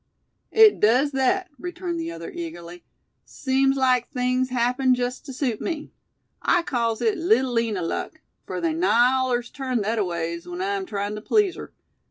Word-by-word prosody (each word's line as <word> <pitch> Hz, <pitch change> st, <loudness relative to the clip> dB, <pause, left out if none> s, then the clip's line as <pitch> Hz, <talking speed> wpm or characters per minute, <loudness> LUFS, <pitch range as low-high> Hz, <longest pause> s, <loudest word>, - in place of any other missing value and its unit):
"It 440 Hz, -1 st, +6 dB
does 250 Hz, +7 st, +3 dB
thet," 330 Hz, +8 st, +1 dB
returned 355 Hz, 0 st, -4 dB
the 330 Hz, 0 st, -4 dB
other, 365 Hz, -, -7 dB
eagerly. 175 Hz, -, -8 dB, 0.4 s
"Seems 270 Hz, 0 st, 0 dB
like 255 Hz, -2 st, +2 dB
things 255 Hz, 0 st, 0 dB
happened 250 Hz, +1 st, +2 dB
jest 250 Hz, +4 st, -4 dB
tew -, -, -6 dB
suit 250 Hz, -4 st, -2 dB
me. 315 Hz, -3 st, -4 dB, 0.5 s
I 350 Hz, -, +2 dB
calls 230 Hz, -6 st, -1 dB
it 420 Hz, -5 st, +1 dB
'Little 325 Hz, -, +2 dB
Lina 225 Hz, -6 st, 0 dB
luck,' 165 Hz, -, -4 dB, 0.3 s
fur -, -, -4 dB
they 335 Hz, -2 st, 0 dB
nigh 255 Hz, -7 st, +4 dB
allers 250 Hz, -2 st, 0 dB
turn 255 Hz, -5 st, -2 dB
thetaways 170 Hz, -6 st, -2 dB
when 175 Hz, 0 st, -6 dB
I'm 195 Hz, 0 st, -2 dB
tryin' 205 Hz, -1 st, -3 dB
tew 210 Hz, -, -6 dB
please 400 Hz, -, +2 dB
her. -, -, -9 dB
255 Hz, 165 wpm, -24 LUFS, 225-315 Hz, 0.5 s, It